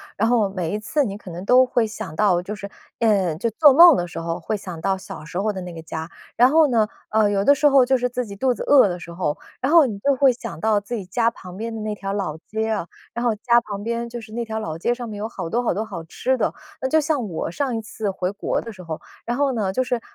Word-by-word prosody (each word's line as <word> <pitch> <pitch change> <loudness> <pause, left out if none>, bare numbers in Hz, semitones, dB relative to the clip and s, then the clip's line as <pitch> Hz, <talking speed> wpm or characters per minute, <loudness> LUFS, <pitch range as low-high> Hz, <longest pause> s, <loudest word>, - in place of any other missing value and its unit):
然 225 +3 +1
后 225 -5 +3
每 180 -4 -3
一 210 - -1
次 285 +7 0
你 200 -4 -4
可 190 - -11
能 175 +2 -7
都 250 +5 +6
会 245 -2 +1
想 200 -7 -7
到 185 -3 +3
就 200 +4 -6
是 200 -1 -8 0.3
呃， 200 -8 +2
就 210 +9 -1
做 280 +5 +6
梦 335 0 +9
的 175 - -2
时 175 - -10
候 165 +1 -3
会 215 +6 -2
想 180 -5 -7
到 195 +2 0
小 170 -4 -9
时 175 +3 -7
候 210 +2 +1
的 190 - -6
那 180 -1 -7
个 165 - -8
家。 160 +1 -6 0.3
然 245 +2 +6
后 310 +1 +5
呢， 225 -4 +3 0.2
呃， 215 -1 +3
有 200 -1 +1
的 285 - +6
时 295 +1 +3
候 275 -2 +6
就 265 +1 +3
是 250 0 0
自 250 0 -3
己 200 - -9
肚 255 +2 +2
子 - - -6
饿 275 -7 +6
的 175 - -3
时 170 -1 -10
候， 170 -4 -2 0.2
然 270 +6 0
后 330 -3 +8
你 210 -6 -4
就 275 +5 +2
会 270 0 +5
想 235 -2 -7
到 215 0 +3
自 220 +4 -5
己 200 - -5
家 230 +5 +1
旁 180 -3 -11
边 225 +2 -4
的 220 - -5
那 215 0 -2
条 195 -1 -4
老 185 -7 -3
街 220 +1 -2
啊， 205 -6 -2 0.3
然 240 +1 -3
后 230 -2 +2
家 235 +3 +3
旁 205 -3 -7
边 235 +1 -2
就 235 0 -7
是 220 -1 -13
那 235 +1 -3
条 220 0 -3
老 160 -6 -4
街 235 +8 0
上 240 -2 -6
面 210 - -6
有 215 - -2
好 195 -7 -6
多 240 +7 0
好 245 - 0
多 210 - -2
好 170 -6 -7
吃 255 +10 -1
的。 - - 0 0.3
那 260 - 0
就 315 +3 +3
像 290 -7 -1
我 165 -2 -4
上 265 +3 -2
一 225 - -2
次 215 -1 -4
回 185 0 -2
国 200 - -2
的 230 - -8
时 190 -4 -12
候， 165 -3 -6 0.2
然 240 - -1
后 280 -1 +2
呢 205 -6 -1
就 255 - +1
是， 245 -1 -1
215 Hz, 315 characters per minute, -22 LUFS, 190-245 Hz, 0.3 s, 梦